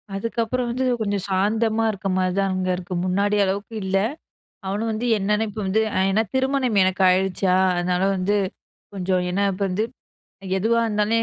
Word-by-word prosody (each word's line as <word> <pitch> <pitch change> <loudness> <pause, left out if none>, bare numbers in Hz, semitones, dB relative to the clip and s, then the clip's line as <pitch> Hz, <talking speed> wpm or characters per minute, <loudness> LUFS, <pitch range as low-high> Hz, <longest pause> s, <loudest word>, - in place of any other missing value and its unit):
அதுக்கப்பறம் 230 +3 -2
வந்து, 255 +2 -1 0.2
கொஞ்சம் 200 -3 -1
சாந்தமா 220 +4 +1
இருக்க 195 -1 -5
மாரி 185 -1 +1
தான் 195 -1 +1
அங்க 185 0 -1
இருக்கு. 180 0 -7
முன்னாடி 200 +3 +1
அளவுக்கு 200 +4 -3
இல்ல. 195 +1 +1 0.7
அவனும் 205 +4 -2
வந்து 220 +3 -3
என்னனு 210 +2 +1
இப்போ 210 +1 -6
வந்து 205 +4 +2
அ, - - +1
ஏனா 220 +3 +2
திருமணம் 260 -5 +1
எனக்கு 185 +1 0
ஆயிருச்சா, 185 0 +1 0.2
அதனால 180 +1 0
வந்து 190 +2 0 0.6
கொஞ்சம் 185 -1 0
என்ன 195 - 0
இப்ப 185 - -9
வந்து, 200 +4 0 0.7
எதுவா 230 +4 +2
இருந்தாலும் 215 +1 +1
200 Hz, 160 wpm, -23 LUFS, 185-220 Hz, 0.7 s, வந்து